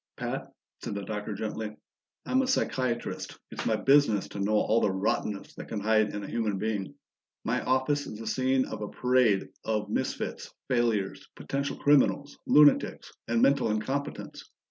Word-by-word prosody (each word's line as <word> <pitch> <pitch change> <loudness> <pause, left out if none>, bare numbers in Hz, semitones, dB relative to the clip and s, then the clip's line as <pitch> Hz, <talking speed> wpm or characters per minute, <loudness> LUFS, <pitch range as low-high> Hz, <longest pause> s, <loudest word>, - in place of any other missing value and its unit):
"Pat," - - -4 0.3
said - - -4
the 100 - -4
Doctor 105 0 -4
gently, 110 +1 -4 0.5
"I'm 260 - +2
a 265 - -1
psychiatrist; 130 - -1
it's - - -4
my - - +3
business 135 -8 +3
to 100 - -7
know 100 +2 0
all 110 +2 +3
the - - +3
rottenness 100 +1 -2
that - - -9
can 110 - -3
hide 110 0 +2
in 105 - -4
a - - -6
human 110 -4 -1
being. 105 -2 -3 0.5
My - - 0
office 130 +3 +1
is 105 - -7
the 115 - -8
scene 130 0 +1
of 110 - -6
a 105 - -4
parade 125 -6 +2
of 105 -2 -2
misfits, - - -3 0.2
failures, 115 -6 0
potential 140 +1 -3
criminals, 145 0 +3
lunatics, 150 -1 +4
and 115 0 +2
mental 140 -4 +4
incompetents. 135 +7 -3
110 Hz, 165 wpm, -28 LUFS, 105-130 Hz, 0.5 s, lunatics